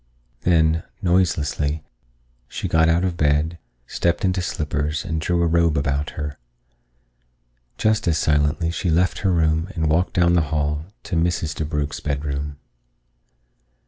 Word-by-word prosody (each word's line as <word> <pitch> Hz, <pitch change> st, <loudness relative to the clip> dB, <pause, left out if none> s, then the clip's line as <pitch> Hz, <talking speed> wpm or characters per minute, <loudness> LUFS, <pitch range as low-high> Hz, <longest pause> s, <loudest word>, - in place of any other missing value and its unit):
Then, 80 Hz, -2 st, +3 dB, 0.2 s
noiselessly, 80 Hz, -5 st, +1 dB, 0.6 s
she -, -, -4 dB
got 80 Hz, 0 st, +3 dB
out 85 Hz, +2 st, +3 dB
of 90 Hz, -2 st, -1 dB
bed, 75 Hz, +2 st, +1 dB, 0.3 s
stepped 85 Hz, +7 st, 0 dB
into 90 Hz, 0 st, +1 dB
slippers, 75 Hz, -3 st, -2 dB
and 80 Hz, -2 st, -2 dB
drew 85 Hz, +1 st, +1 dB
a -, -, +3 dB
robe 85 Hz, -1 st, +2 dB
about 70 Hz, +4 st, -1 dB
her. 75 Hz, -1 st, -4 dB, 1.4 s
Just 110 Hz, -3 st, +1 dB
as 80 Hz, -2 st, +3 dB
silently 75 Hz, +2 st, +1 dB
she 85 Hz, +1 st, -2 dB
left 85 Hz, +2 st, +2 dB
her 95 Hz, -, +1 dB
room 80 Hz, 0 st, +1 dB
and 80 Hz, -2 st, 0 dB
walked 85 Hz, +4 st, +1 dB
down 85 Hz, -2 st, +3 dB
the 85 Hz, -, +4 dB
hall 75 Hz, 0 st, -1 dB, 0.2 s
to 100 Hz, -3 st, -4 dB
Mrs. 80 Hz, -2 st, 0 dB
DeBrugh's 75 Hz, -1 st, -2 dB
bedroom. 70 Hz, 0 st, -3 dB
80 Hz, 140 wpm, -22 LUFS, 75-85 Hz, 1.4 s, the